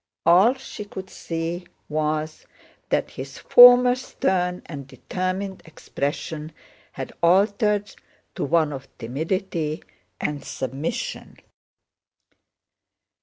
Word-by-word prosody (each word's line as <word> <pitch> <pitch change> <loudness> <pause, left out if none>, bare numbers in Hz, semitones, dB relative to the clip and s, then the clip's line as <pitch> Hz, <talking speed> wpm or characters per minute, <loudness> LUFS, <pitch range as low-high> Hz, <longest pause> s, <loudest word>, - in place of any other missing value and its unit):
All 190 +9 +6
she 260 -5 -8
could 190 -2 -9
see 170 +2 -4 0.2
was 155 0 -2 0.4
that - - 0
his 135 +1 -8
former 245 0 +8
stern 180 -8 -1
and 140 -4 -8
determined 185 +8 -4
expression 155 0 -5 0.4
had - - -6
altered 205 +3 +2 0.4
to - - -3
one 155 0 +2
of 135 0 -8
timidity 160 - -3 0.4
and 145 -1 -3
submission. 140 - -4
170 Hz, 90 wpm, -24 LUFS, 150-195 Hz, 0.4 s, former